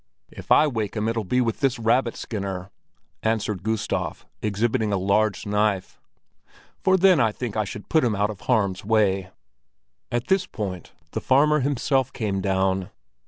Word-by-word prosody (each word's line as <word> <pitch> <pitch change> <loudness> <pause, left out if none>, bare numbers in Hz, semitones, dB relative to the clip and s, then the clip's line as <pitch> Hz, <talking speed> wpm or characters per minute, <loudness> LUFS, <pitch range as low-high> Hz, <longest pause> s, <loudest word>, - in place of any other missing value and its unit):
"If - - -11
I - - +7
wake 110 -8 -2
him, 110 0 -1
it'll 115 -1 -1
be 125 +7 +1
with 115 -2 -1
this 135 -2 +1
rabbit 115 +1 +1
skinner," 95 -3 -5 0.5
answered 110 -4 -1
Gustav, 110 +1 -2 0.2
exhibiting 110 +1 0
a 100 - +1
large 100 +2 +1
knife. 105 -2 -1 0.8
"For 190 0 +3
then 185 -3 +5
I 110 -3 +3
think 115 0 -5
I 110 -1 0
should 105 +2 -8
put 160 - +3
him 115 -4 +1
out 105 +1 +1
of 100 - -10
harm's 100 -6 +1
way." 100 -3 +2 0.8
At 120 +1 -1
this 190 -1 +1
point 95 -6 -5 0.2
the - - -3
farmer 150 +3 +4
himself 135 -1 0
came 100 -5 -2
down. 95 -1 0
110 Hz, 165 wpm, -24 LUFS, 100-125 Hz, 0.8 s, I